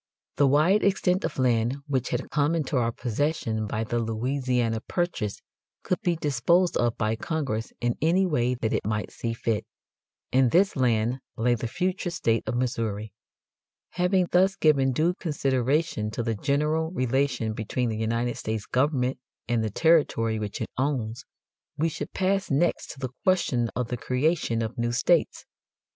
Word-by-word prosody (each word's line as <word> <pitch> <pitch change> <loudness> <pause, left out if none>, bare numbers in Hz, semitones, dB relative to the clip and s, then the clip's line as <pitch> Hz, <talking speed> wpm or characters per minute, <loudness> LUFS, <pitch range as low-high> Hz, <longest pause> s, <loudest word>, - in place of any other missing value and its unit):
The 140 0 +5
wide 155 +10 +4
extent 190 -1 +2
of - - -4
land 120 0 +2
which 130 -4 -1
had 125 +1 -3
come 150 +2 +2
into 150 -3 -2
our 120 -2 +2
possession 115 -3 -1
by 110 +1 -2
the 120 +1 -1
Louisiana 120 0 -1
Purchase 175 - -2 0.4
could 185 - -1
be 175 -5 +1
disposed 165 +5 +2
of 120 -1 +1
by 110 0 0
Congress 125 -5 -3
in 120 0 0
any 175 +5 +3
way 125 -7 +1
that 115 -2 -2
it - - 0
might 105 -1 -2
see 115 -1 -3
fit. 115 -2 -1 0.7
In 130 -1 +4
this 190 +9 +3
land 120 -1 +1 0.2
lay 120 +2 +2
the 120 0 -2
future 180 +7 -2
state 115 -10 0
of - - -1
Missouri. 115 -4 -2 0.8
Having 180 0 +1
thus 190 +2 +4
given 140 -5 +3
due 160 +7 +2
consideration 140 - 0
to 115 +2 -3
the 115 -1 0
general 150 +7 0
relation 130 -6 0
between 115 +3 -2
the 110 - -3
United 115 +2 -1
States 110 -1 -3
government 130 -1 0 0.3
and 120 -1 +1
the 110 - -1
territory 115 - +2
which 105 -1 -4
it - - -4
owns, 130 -2 -1 0.5
we 160 +2 +1
should 145 -1 -6
pass 195 +1 0
next 160 +5 +1
to 140 - -9
the 130 -2 -3
question 135 -11 +2
of 125 -1 -2
the 125 - -2
creation 125 -2 0
of 115 +3 -5
new 120 0 0
states. 160 +6 +1
130 Hz, 165 wpm, -26 LUFS, 115-160 Hz, 0.8 s, The